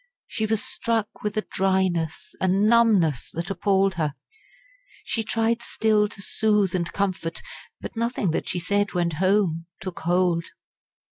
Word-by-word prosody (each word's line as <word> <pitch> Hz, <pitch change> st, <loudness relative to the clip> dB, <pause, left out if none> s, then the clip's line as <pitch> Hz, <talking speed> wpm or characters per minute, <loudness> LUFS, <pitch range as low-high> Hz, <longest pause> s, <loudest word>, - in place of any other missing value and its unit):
She 220 Hz, -, -2 dB
was 220 Hz, +1 st, 0 dB
struck 230 Hz, -4 st, -2 dB
with 210 Hz, +1 st, -3 dB
a 215 Hz, -, 0 dB
dryness, 185 Hz, -4 st, 0 dB
a 190 Hz, -, +2 dB
numbness, 200 Hz, -, +3 dB
that 170 Hz, +3 st, -3 dB
appalled 195 Hz, 0 st, +2 dB
her. 150 Hz, -2 st, -1 dB, 0.9 s
She 225 Hz, -, -2 dB
tried 225 Hz, +1 st, 0 dB
still 215 Hz, -2 st, +2 dB
to 200 Hz, -, -8 dB
soothe 210 Hz, -4 st, +2 dB
and 170 Hz, -2 st, -1 dB
comfort, 185 Hz, -4 st, -2 dB, 0.4 s
but -, -, -8 dB
nothing 230 Hz, -5 st, 0 dB
that -, -, -2 dB
she -, -, -1 dB
said 200 Hz, +3 st, 0 dB
went 170 Hz, -2 st, +1 dB
home 185 Hz, -4 st, +2 dB
took 185 Hz, -1 st, -6 dB
hold. 175 Hz, -1 st, +1 dB
195 Hz, 145 wpm, -24 LUFS, 175-215 Hz, 0.9 s, numbness